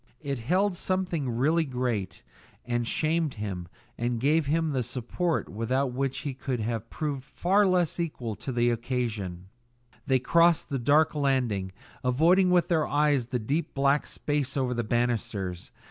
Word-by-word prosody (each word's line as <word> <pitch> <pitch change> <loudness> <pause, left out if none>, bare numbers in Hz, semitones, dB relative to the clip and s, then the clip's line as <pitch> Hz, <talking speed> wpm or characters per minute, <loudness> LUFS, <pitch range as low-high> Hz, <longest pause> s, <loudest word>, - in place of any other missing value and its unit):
It 140 -3 -2
held 180 - +1
something 175 -7 -1
really 145 +8 +2
great 125 - -3 0.4
that 120 -1 0
shamed 160 +1 +1
him 95 -5 -5 0.3
and 120 0 -1
gave 150 +4 +2
him 160 +1 +1
the 130 -2 0
support 125 +8 -2
without 125 +5 -1
which 135 +1 -2
he 140 -3 -4
would 125 -3 0
have 115 0 -3
proved 145 -4 -3
far 195 +8 +2
less 180 -2 +1
equal 130 -9 -3
to 130 - -5
the 120 -1 +2
occasion. 110 -7 -3 0.6
They 130 - +4
crossed 170 +5 +3
the 135 - -1
dark 145 +6 +3
landing, 125 -10 0 0.3
avoiding 165 +9 +4
with 180 -1 +3
their 160 -3 +1
eyes 145 -4 +2
the 125 - -1
deep 140 +9 -2
black 140 +1 +2
space 145 -2 -2
over 130 -2 0
the 120 -1 -1
banisters. 110 -6 -2
130 Hz, 155 wpm, -27 LUFS, 120-155 Hz, 0.6 s, They